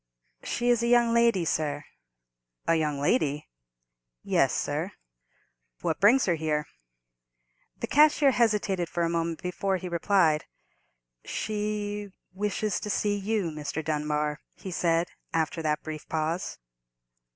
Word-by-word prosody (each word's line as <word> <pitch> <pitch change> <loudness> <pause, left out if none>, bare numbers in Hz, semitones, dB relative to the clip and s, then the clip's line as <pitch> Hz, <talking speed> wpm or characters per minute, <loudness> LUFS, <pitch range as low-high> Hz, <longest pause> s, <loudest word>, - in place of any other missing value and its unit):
"She 240 0 -1
is 240 -1 +2
a 235 - +1
young 240 -1 +4
lady, 235 -7 +3
sir." 150 -2 -1 0.8
"A 165 - +4
young 150 -3 0
lady?" 145 - +1 0.8
"Yes, - - +3
sir." - - -2 0.9
"What 160 - -1
brings 230 +7 +5
her 175 - +2
here?" 155 -2 -1 1.1
The - - -3
cashier 295 -1 +5
hesitated 210 -7 +1
for 170 - -1
a 165 - +1
moment 165 0 -2
before 190 +2 -1
he 185 - -6
replied, 170 -3 +2 0.8
"She—wishes 210 -1 -3
to 210 - -5
see 205 0 +1
you, 200 -3 -1
Mr. 150 +1 -4
Dunbar," 150 -1 -1 0.2
he 190 - -8
said, 170 0 +1 0.3
after 165 +1 0
that 150 -1 -1
brief 155 -1 -7
pause. 160 +2 -2
175 Hz, 125 wpm, -28 LUFS, 155-210 Hz, 1.1 s, brings